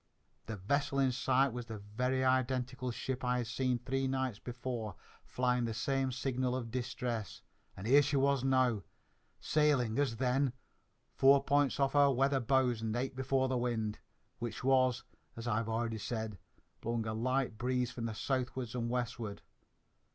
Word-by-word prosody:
The 110 - -3
vessel 140 +9 0
in 135 -1 +3
sight 130 +1 +2
was 120 -1 -5
the 110 -2 -5
very 125 +6 -1
identical 130 0 0
ship 130 +2 -4
I 125 0 +1
had 120 - -1
seen 125 +2 0
three 135 +2 -1
nights 130 -5 -1
before, 120 -3 -5 0.3
flying 125 -1 +1
the 115 -1 -3
same 135 +2 0
signal 125 0 -1
of 120 -3 -4
distress; 120 -4 -3 0.3
and 95 - -7
here 140 +5 +7
she 145 0 0
was 140 -1 +2
now, 130 -5 +3 0.6
sailing, 140 -6 +2
as 135 -5 +1
then, 130 +2 +1 0.6
four 135 +1 +5
points 145 -1 +2
off 135 -1 +2
our 145 -1 +6
weather 135 +1 +2
bows 125 -2 +2
and 110 0 -2
eight 130 +2 -2
before 130 0 +1
the 130 -1 0
wind, 110 -3 -1 0.4
which 120 -1 -5
was, 130 -2 +3 0.3
as 115 +1 -5
I've 115 0 0
already 115 0 -1
said, 110 -3 -4 0.4
blowing 115 -1 -1
a 110 - -2
light 125 0 0
breeze 125 0 0
from 120 -3 -5
the 115 -2 -3
southward 130 -1 -2
and 120 -1 -2
westward. 120 -4 -3
125 Hz, 165 wpm, -33 LUFS, 115-130 Hz, 0.6 s, here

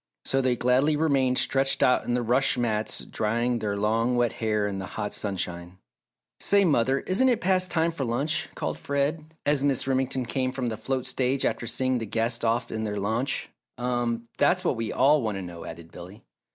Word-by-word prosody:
So 135 - +1
they 130 -1 +1
gladly 130 +5 +2
remained 135 -5 +2
stretched 135 0 +2
out 125 - +3
on 120 - 0
the 125 - 0
rush 125 +3 +2
mats 110 -3 0
drying 120 +3 -1
their 105 -2 -2
long 115 +4 +1
wet 120 -2 +1
hair 105 -2 0
in 100 -1 -3
the 95 - -5
hot 105 - -3
sunshine. 90 -3 -3 0.6
"Say, 200 0 +3
mother, 135 -3 +2
isn't 235 +8 +3
it 240 - +2
past 185 0 +2
time 165 0 +1
for 160 -4 -4
lunch?" 135 +6 -1
called - - -3
Fred, 150 +3 -2
as 145 -1 +2
Mrs. 140 -3 +2
Remington 130 -1 0
came 130 +2 -1
from 130 -2 -2
the 110 - -3
float 130 +3 -3
stage 130 +1 0
after 120 - -1
seeing 130 0 0
the 115 - -5
guests 115 +3 -1
off 115 +1 0
in 110 0 -3
their 105 -1 -3
launch. 110 +7 -1 0.3
"Um 120 -1 -2
that's 180 +1 +3
what - - +2
we 115 -1 -3
all 145 +3 +4
want 110 -4 -2
to - - -4
know," 85 -2 -8
added 85 0 -10
Billy. 95 +4 -11
125 Hz, 200 wpm, -26 LUFS, 110-135 Hz, 0.6 s, all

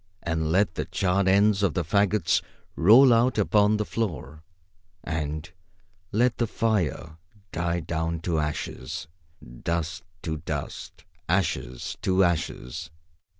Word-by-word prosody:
And 80 -1 -1
let 95 0 +2
the - - -3
charred 95 0 0
ends 100 +1 +4
of 95 -7 +1
the 90 - +1
fagots 100 +1 +2 0.3
roll 120 +8 +7
out 115 +1 +3
upon 105 0 +3
the 105 - -1
floor. 75 - -4 0.6
And 80 0 -3 0.6
let 120 +3 +2
the 120 - +1
fire 90 -9 -1 0.3
die 85 0 -1
down 80 +1 -2
to 85 -2 0
ashes. 75 -1 -4 0.6
Dust 85 0 -2 0.2
to 80 -3 -2
dust. 75 - -6 0.2
Ashes - - -1
to 95 0 +3
ashes. 80 -4 -2
85 Hz, 120 wpm, -26 LUFS, 80-105 Hz, 0.6 s, roll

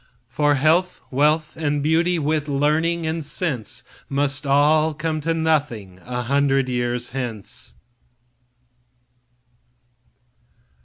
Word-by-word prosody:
For 145 -1 +2
health, 165 +6 +2
wealth 150 +3 +2
and 145 -2 -1
beauty, 165 +3 +2
wit, 155 -1 0
learning 155 +4 +1
and 160 0 -2
sense, 145 - -2 0.3
Must 140 0 -1
all 155 +3 +4
come 155 0 -2
to 165 +2 0
nothing 145 - -1
a 125 0 -3
hundred 135 +1 +2
years 120 0 -1
hence. 120 -6 -5
145 Hz, 100 wpm, -22 LUFS, 135-160 Hz, 0.3 s, all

